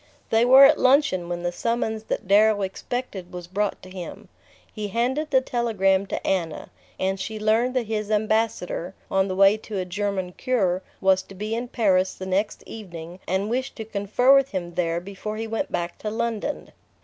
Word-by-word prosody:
They 225 +1 +4
were 265 +2 +9
at 300 +2 +5
luncheon 255 - +3
when 175 0 -3
the 175 - 0
summons 220 +2 -2
that - - -3
Darrow 205 +1 +4
expected 195 -1 -5
was 180 -2 -7
brought 200 +4 -2
to 185 - -11
him. 185 -2 -8 0.4
He 210 -2 -4
handed 255 +9 -1
the 265 -3 +4
telegram 200 -6 +1
to - - -4
Anna, 170 -5 -2 0.3
and 190 +1 0
she 220 +2 -4
learned 225 +4 +2
that 250 -2 +1
his 215 -1 -3
Ambassador, 215 -4 0 0.2
on 195 0 +2
the 185 - -3
way 195 +2 +6
to 215 -1 -7
a 185 - -1
German 190 0 -2
cure, 190 -6 0 0.2
was 190 -1 +4
to 195 - -14
be 210 +3 -4
in 235 +2 -2
Paris 190 -6 +2
the 185 - -7
next 195 +3 -1
evening 175 -4 -9
and 190 +2 0
wished 255 +4 -2
to 220 - -6
confer 215 +5 +3
with 275 0 +3
him 175 -3 -4
there 170 -1 0
before 200 +3 -6
he 225 - -3
went 225 +6 -3
back 170 0 -3
to 215 - -3
London. 230 +4 -3
205 Hz, 190 wpm, -24 LUFS, 185-230 Hz, 0.4 s, were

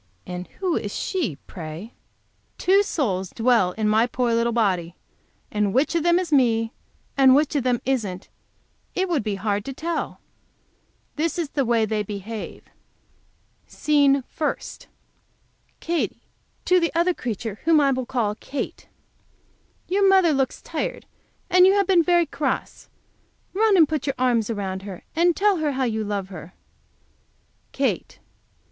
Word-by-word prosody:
And 180 0 -6
who 365 -4 0
is 205 - -3
she, 310 - -2
pray! 170 +5 -8 0.6
Two 390 +2 +4
souls 200 - -1
dwell 225 -6 +2
in 215 +1 -1
my 220 +3 +3
poor 245 -1 0
little 235 +1 +2
body, 185 -7 0 0.6
and 210 -1 0
which 275 +6 +2
of 335 - +1
them 345 +2 +3
is 355 -4 -2
me, 230 -4 +3 0.4
and 265 -1 +6
which 300 +1 +2
of 285 - +2
them 245 -2 +1
isn't, 210 -8 -2 0.7
it 375 +1 +1
would 335 -5 +1
be 210 -2 -2
hard 205 +1 -1
to 270 - -5
tell. 335 +2 -3 1.0
This 330 +3 -1
is 330 -5 -2
the 275 -3 0
way 230 -2 +2
they 215 0 -1
behave: 210 +1 -6 1.0
SCENE 280 -2 +2
FIRST. 300 +4 -4 0.9
Katy, 335 0 -2 0.4
to 365 0 +4
the 335 -1 0
other 345 +2 +3
creature, 225 - -5
whom 325 -1 +5
I 280 -2 +3
will 260 -2 -2
call 235 -6 0
Kate. 275 +6 -6 1.0
Your 390 +1 +3
mother 380 -4 +5
looks 270 -1 -1
tired, - - -4 0.4
and 365 +1 +6
you 385 - +5
have 400 -1 +3
been 360 -2 +4
very 345 0 +3
cross. 290 -2 -3 0.6
Run 420 0 +3
and 320 -3 +6
put 305 -2 -3
your 275 - 0
arms 240 -4 +1
around 195 -4 -3
her, 195 -2 -9
and 340 +1 +3
tell 405 -1 +3
her 305 -3 0
how 265 0 -1
you 220 -3 -1
love 200 -2 -3
her. 175 -1 -10 1.2
Kate. - - -2
255 Hz, 155 wpm, -23 LUFS, 210-330 Hz, 1.2 s, and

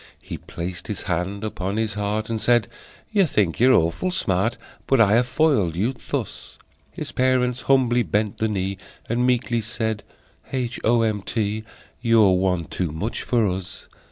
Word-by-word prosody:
He - - -6
placed 85 +1 -6
his 105 - -4
hand 95 +4 -2
upon 100 -1 -3
his 110 -2 0
heart, 105 +1 -2
And 115 -1 -3
said: 120 -4 +3 0.4
"You 200 -5 +4
think 100 - +1
you're 130 +3 +6
awful 85 - +1
smart, 115 - 0 0.3
But 135 - +3
I 105 -2 +5
have 120 +2 +3
foiled 130 - +2
you 110 +9 0 0.2
thus!" - - -4 0.3
His - - -6
parents 130 -1 +1
humbly 125 -3 +3
bent 105 +1 -1
the 110 - +2
knee, 95 -2 -2 0.3
And 120 +2 +1
meekly 120 -2 +1
said: 110 -1 -3 0.5
"H. 130 -1 -2
O. 115 0 +3
M. 110 -2 0
T., 110 +1 -2 0.4
You're 115 -4 +5
one 90 -2 +1
too 90 -1 -3
much 85 +9 -3
for 115 -4 +2
us!" 95 0 -5
110 Hz, 165 wpm, -23 LUFS, 95-120 Hz, 0.5 s, you're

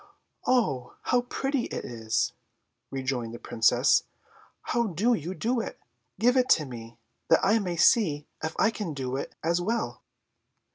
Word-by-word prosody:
"Oh, 135 - +1
how 245 - +2
pretty 270 +1 -2
it - - -5
is!" 115 -2 -1 0.6
rejoined 125 -3 -3
the - - -6
Princess. 120 +3 +3 0.6
"How 235 -2 0
do 210 +7 +2
you 180 -2 -3
do 235 +4 0
it? - - -5 0.4
Give 245 +3 +3
it 255 -1 +3
to 155 - -5
me, 115 -3 -9 0.3
that - - +4
I 210 +4 +4
may 180 -4 -2
see 165 - +4 0.2
if 160 0 -3
I 225 - +4
can 195 -9 -5
do 130 -1 -3
it 135 - -5
as 170 +2 +1
well." 225 +6 -2
170 Hz, 155 wpm, -27 LUFS, -, 0.6 s, that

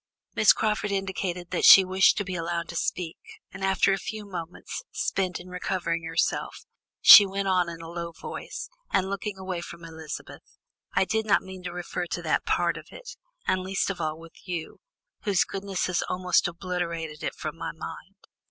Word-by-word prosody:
Miss 220 -2 +6
Crawford 210 -1 0
indicated 190 -2 -3
that - - -1
she 195 - +10
wished 190 +1 +4
to 205 - 0
be 185 -1 -5
allowed 170 -1 -2
to 170 - -7
speak, 170 0 -2 0.3
and 190 +1 -8
after 195 0 +3
a 195 - -1
few 215 +2 -6
moments 175 -4 -6
spent 185 -2 -1
in 180 - -11
recovering 180 -2 -2
herself, 165 - -1 0.4
she 210 - +12
went 195 0 -2
on 180 -2 +2
in 165 -1 -8
a 165 - -8
low 170 0 -5
voice, - - -7 0.2
and 190 0 +1
looking 200 0 -4
away 185 -2 -4
from 170 -1 -9
Elizabeth: 160 -2 -9 0.4
"I - - +4
did 220 +2 -1
not 205 - +4
mean 190 0 -9
to 175 - -3
refer 175 0 -4
to - - -3
that - - 0
part - - +1
of - - -10
it, - - -10 0.3
and 185 0 +1
least 190 +1 -1
of 190 - -6
all 155 0 -2
with 165 +3 -15
you, 175 -3 -5 0.4
whose 200 -4 +2
goodness 195 -1 -3
has 180 -1 0
almost 180 -1 +2
obliterated 170 -3 -4
it - - -3
from - - -5
my - - -4
mind. - - -9
185 Hz, 190 wpm, -27 LUFS, 170-195 Hz, 0.4 s, she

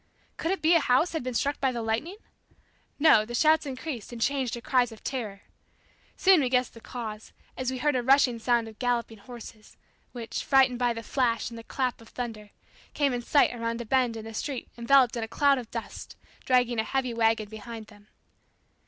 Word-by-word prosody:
Could 325 - -3
it 385 -2 -2
be 325 +2 +5
a 335 - +6
house 280 +4 +2
had 320 - -2
been 255 -1 -4
struck 285 +4 0
by 265 -1 +1
the 235 -2 -4
lightning? 235 - -2 0.8
No, 290 -8 +6
the 240 +2 -6
shouts 310 +3 +3
increased 260 -4 -6
and 240 - -7
changed 265 0 0
to 240 - -3
cries 245 0 +1
of 220 - -13
terror. 215 -7 -4 0.8
Soon 380 -2 +6
we 255 - 0
guessed 250 -1 +1
the 230 - -13
cause, 220 -3 -7 0.2
as 255 -1 -2
we 260 - -3
heard 295 +2 +1
a 250 - +1
rushing 260 -2 +4
sound 235 0 +1
of 220 -1 -13
galloping 240 -3 -1
horses, 225 -1 -12 0.3
which, 235 -2 -5
frightened 265 -2 +4
by 245 -1 +2
the 230 0 -5
flash 235 -2 0
and 230 - -8
the - - -10
clap 250 -1 -2
of 225 - -15
thunder, 225 -4 -6 0.5
came 280 -3 +2
in 245 - -2
sight 280 +3 +3
around 230 0 -3
a 235 - -5
bend 245 -1 +1
in 220 - -8
the 225 - -8
street 265 +2 -4
enveloped 250 +1 +4
in 235 - -2
a - - -4
cloud 280 +3 +3
of 235 -3 -9
dust, 230 -1 -7 0.3
dragging 245 -2 +2
a - - +2
heavy 255 0 -1
wagon 225 -2 +1
behind 220 +1 -9
them. 205 -1 -19
245 Hz, 210 wpm, -27 LUFS, 225-265 Hz, 0.8 s, a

